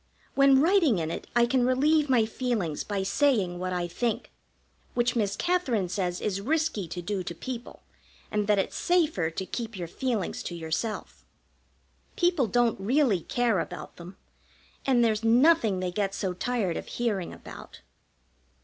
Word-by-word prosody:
When 275 -1 +5
writing 325 - +4
in 160 -1 -2
it - - -6
I 240 0 +5
can 250 +1 +2
relieve 290 +4 +3
my 240 -4 +4
feelings 220 - -2
by 200 -2 -2
saying 195 -4 +1
what 185 0 -3
I 175 -1 -1
think, 230 +6 -2 0.6
which 240 0 +1
Miss 205 -4 0
Katherine 260 - 0
says 180 -1 -2
is 195 -1 -2
risky 300 - 0
to 175 +2 -6
do 200 +1 -2
to 170 -1 -6
people, 245 +4 -7 0.5
and 210 -1 0
that 210 -1 +4
it's 195 - -1
safer 315 - +1
to 175 +3 -5
keep 225 0 -5
your 175 -2 -4
feelings 225 +1 -2
to 175 - -5
yourself. 170 +7 -4 0.9
People 345 -8 +2
don't 235 +1 +2
really 235 -1 +2
care 235 -2 +1
about - - -6
them, 175 +2 -11 0.7
and 250 -3 +4
there's 220 -1 0
nothing 230 - +4
they 180 -1 -2
get 195 +1 -1
so 190 -2 -2
tired 200 -3 -1
of - - -6
hearing 210 -7 -2
about. - - -11
220 Hz, 160 wpm, -27 LUFS, 185-255 Hz, 0.9 s, When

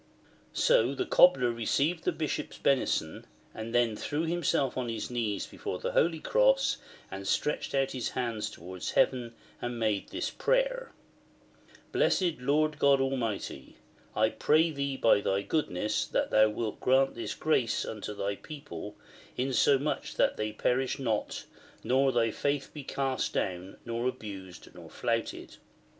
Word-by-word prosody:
So - - +3
the 375 - -1
Cobler 135 - +5
received 140 +8 0
the - - +3
Bishop's 150 -1 -3
benison, 125 - 0 0.3
and 110 +1 -6
then 120 -2 +2
threw 145 +8 -2
himself 160 -6 0
on 125 -2 -2
his 115 +1 -4
knees 110 -5 -1
before - - -5
the - - -3
Holy 165 0 +2
Cross, - - +3 0.3
and 95 0 -6
stretched 150 +4 0
out 135 0 +1
his 125 -3 -2
hands 115 -4 -1
towards 90 -2 -6
Heaven, 120 -3 +2 0.3
and 120 0 -3
made 110 -3 0
this - - -3
prayer: - - 0 0.5
" - - -27
Blessed 175 -6 +2
Lord 150 +4 +1
God 140 -1 +5
Almighty, 115 - -2 0.4
I 110 +1 +3
pray 160 +7 +3
Thee 140 -2 -2
by 110 -4 +4
Thy 100 0 0
goodness 105 - -1
that - - -1
Thou 110 0 +6
wilt 110 0 -3
grant 135 +1 +3
this 110 -3 -5
grace 140 -7 +1
unto 105 -1 -5
Thy 100 0 -2
people, 140 - -8 0.4
insomuch 135 +3 +1
that - - +2
they 105 0 -2
perish 125 +5 0
not, 115 -6 -2 0.4
nor 135 +1 +3
Thy 115 -2 +2
faith 140 +3 -1
be 150 - -7
cast 135 -1 -1
down, 90 +1 -3
nor 120 +1 -1
abused 100 -7 -7
nor - - -12
flouted. - - -3
125 Hz, 150 wpm, -30 LUFS, 110-145 Hz, 0.5 s, Thou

